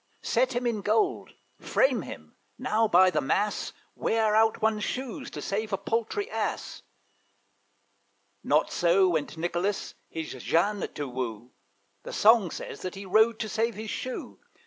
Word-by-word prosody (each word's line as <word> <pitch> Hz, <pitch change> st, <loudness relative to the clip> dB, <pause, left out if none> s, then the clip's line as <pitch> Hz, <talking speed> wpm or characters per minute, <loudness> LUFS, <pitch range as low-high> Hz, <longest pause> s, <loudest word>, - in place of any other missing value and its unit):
Set 255 Hz, +2 st, +1 dB
him 245 Hz, +1 st, -1 dB
in 230 Hz, -3 st, 0 dB
gold 390 Hz, -, 0 dB, 0.2 s
frame -, -, +2 dB
him -, -, -10 dB, 0.2 s
now, 225 Hz, +1 st, +1 dB
by 185 Hz, -1 st, +6 dB
the -, -, +1 dB
mass, 200 Hz, +9 st, 0 dB, 0.2 s
Wear 220 Hz, -1 st, +1 dB
out 220 Hz, 0 st, +4 dB
one's 215 Hz, -1 st, +1 dB
shoes, 255 Hz, -1 st, -4 dB
to -, -, -7 dB
save 215 Hz, +2 st, -2 dB
a 195 Hz, -, +1 dB
paltry 230 Hz, -, -2 dB
Ass! -, -, -3 dB, 1.6 s
Not -, -, +2 dB
so 180 Hz, +2 st, +4 dB
went 160 Hz, -1 st, -2 dB
Nicolas 175 Hz, +4 st, -2 dB, 0.2 s
his 160 Hz, -1 st, -5 dB
Jeanne 200 Hz, +4 st, +1 dB
to 145 Hz, -, -3 dB
woo; 120 Hz, -2 st, -5 dB, 0.5 s
The -, -, -8 dB
song 220 Hz, -3 st, +5 dB
says -, -, -7 dB
that 185 Hz, -, -5 dB
he 195 Hz, +1 st, -8 dB
rode 220 Hz, +4 st, +4 dB
to 220 Hz, -, -2 dB
save 225 Hz, +2 st, -1 dB
his 215 Hz, +1 st, -5 dB
shoe. 255 Hz, -, -5 dB
210 Hz, 150 wpm, -27 LUFS, 180-225 Hz, 1.6 s, by